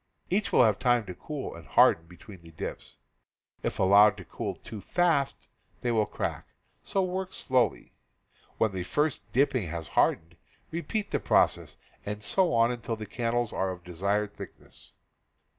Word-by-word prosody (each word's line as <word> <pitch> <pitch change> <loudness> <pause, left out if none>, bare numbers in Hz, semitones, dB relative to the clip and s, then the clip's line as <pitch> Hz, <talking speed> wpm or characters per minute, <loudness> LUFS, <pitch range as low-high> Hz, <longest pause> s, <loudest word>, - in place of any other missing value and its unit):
Each 200 +2 +1
will - - +6
have 110 -3 +3
time 120 -3 +2
to 90 - -6
cool 145 - -6
and 85 -2 -12
harden 80 0 +4
between 90 +2 -13
the 85 - -14
dips. 80 - -7 0.6
If - - -3
allowed 100 +2 +6
to 90 - -10
cool - - -4
too 110 -3 -9
fast 160 - +1 0.3
they 120 - 0
will 110 -2 +2
crack: - - -4 0.3
so 195 - 0
work 185 +1 -3
slowly. 125 -6 0 0.6
When 110 - +2
the 95 -1 -4
first 145 - -1
dipping 130 -6 +2
has 80 -1 -6
hardened, 85 +2 +1 0.3
repeat 200 +6 -3
the - - +1
pro - - +5
cess, - - -10 0.3
and 105 +1 -5
so 185 - +2
on 115 0 +4
until 115 -1 -3
the 110 -1 -7
candles 120 +2 -1
are 95 - 0
of 90 -1 -7
desired 100 +4 -1
thick - - -9
ness. - - -11
110 Hz, 170 wpm, -28 LUFS, 95-135 Hz, 0.6 s, will